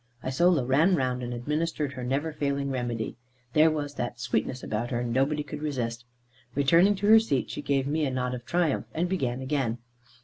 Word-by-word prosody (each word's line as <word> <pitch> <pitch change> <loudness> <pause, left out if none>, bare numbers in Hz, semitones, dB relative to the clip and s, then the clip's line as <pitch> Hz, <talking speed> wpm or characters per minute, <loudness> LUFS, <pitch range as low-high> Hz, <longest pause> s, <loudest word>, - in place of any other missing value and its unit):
Isola 145 +2 +2
ran 155 +9 +4
round, 130 -4 -1
and 120 0 -4
administered 150 +3 -2
her 125 -1 -6
never 140 +5 -1
failing 140 -2 -1
remedy. 120 -3 -3 0.4
There 155 +1 +6
was 145 -2 -3
that 120 -2 -4
sweetness 130 +1 -1
about 115 +3 -2
her 120 -1 -1
nobody 135 +5 +1
could 150 0 -7
resist 120 -5 -3 0.5
it. - - -14
Returning 170 +9 +5
to 195 +1 -3
her 220 0 +9
seat, 145 - -1
she - - -5
gave 140 -2 0
me 155 +3 0
a - - 0
nod 125 -1 -2
of 125 -1 -5
triumph, 170 +1 0
and 170 +2 +1
began 130 -9 -1
again. 130 -4 -1
135 Hz, 195 wpm, -27 LUFS, 125-155 Hz, 0.5 s, her